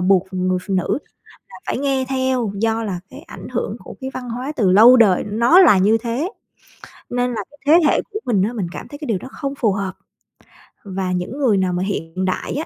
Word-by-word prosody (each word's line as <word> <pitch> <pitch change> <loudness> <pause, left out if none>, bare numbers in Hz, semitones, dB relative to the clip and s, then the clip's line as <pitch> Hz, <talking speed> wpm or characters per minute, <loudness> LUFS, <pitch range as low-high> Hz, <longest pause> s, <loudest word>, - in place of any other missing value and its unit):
buộc 190 0 +3
người 185 0 0
phụ 195 - 0
nữ 185 +8 0 0.5
là - - -12
phải - - -1
nghe 270 -1 0
theo, 260 -5 0
do 225 +2 0
là 195 -5 -3
cái 275 +3 -11
ảnh - - -10
hưởng - - -3
của - - -11
cái 265 - -4
văn 250 -2 -6
hóa 250 +5 -4
từ 195 -6 +2
lâu 230 +6 +8
đời 205 -6 +4
nó 235 - +4
là 335 - +7
như 205 +4 +4
thế. 240 - -3 0.8
Nên 245 0 -1
là 225 - -3
cái 290 - -19
thế 325 +2 +5
hệ - - +2
của 425 - -4
mình 215 -6 +1
á, 230 +4 -1
mình 200 -7 -3
cảm - - -8
thấy 290 - -10
cái 295 - -7
điều 220 -5 0
đó 225 - -9
không 275 -2 -4
phù 225 -7 +1
hợp 195 -1 -3 0.9
và 190 -2 -3
những 180 +9 -3
người 245 -8 +2
nào 185 -1 0
mà 180 +1 -1
hiện 185 -2 -3
đại 185 - -2
á, 310 - -2
225 Hz, 230 wpm, -20 LUFS, 190-260 Hz, 0.9 s, lâu